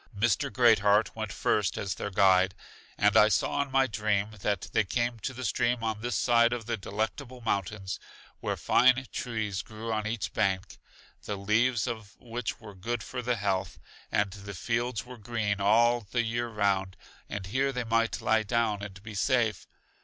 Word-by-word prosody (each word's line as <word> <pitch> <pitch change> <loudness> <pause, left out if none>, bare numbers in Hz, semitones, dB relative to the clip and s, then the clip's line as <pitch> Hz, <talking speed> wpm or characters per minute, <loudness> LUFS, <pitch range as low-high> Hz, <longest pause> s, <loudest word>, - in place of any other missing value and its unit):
Mr. 120 +6 +1
Great 115 -1 +5
heart 105 +2 +3
went 110 -2 -4
first 100 -1 0
as 95 -2 -2
their 100 - -4
guide; 95 -1 +4 0.4
and 105 0 +3
I 105 -1 +8
saw 105 - +1
in 140 - -3
my 135 0 +3
dream 105 -2 0
that 100 -1 0
they 110 - +4
came 120 +3 -1
to 130 - -3
the 130 0 -6
stream 120 +2 +1
on 110 -1 -2
this 120 -2 -2
side 120 +1 +4
of 120 -2 -4
The 120 0 -1
Delectable 110 +5 -4
Mountains, 100 -3 -2 0.4
where - - -2
fine 130 +1 +4
trees 110 -5 -2
grew 110 +1 -6
on 110 0 -1
each 115 -1 -3
bank, 95 -2 -1 0.5
the 105 - -2
leaves 110 +4 +2
of 110 -3 -6
which 120 -1 -4
were 105 -2 -11
good 110 +4 -3
for 125 - -5
the 125 0 0
health, 100 -3 -1 0.3
and 100 -1 +1
the 100 0 -8
fields 120 +4 -1
were 125 -1 -10
green 105 -3 -2
all 120 +4 +4
the 120 -1 +1
year 120 +1 -1
round; 100 -4 0 0.3
and 100 -2 -4
here 130 +8 0
they 125 -2 -2
might 115 0 +1
lie 110 -1 +3
down 110 -1 0
and 95 -1 -8
be 110 0 -8
safe. 115 0 +1
110 Hz, 185 wpm, -29 LUFS, 100-120 Hz, 0.5 s, I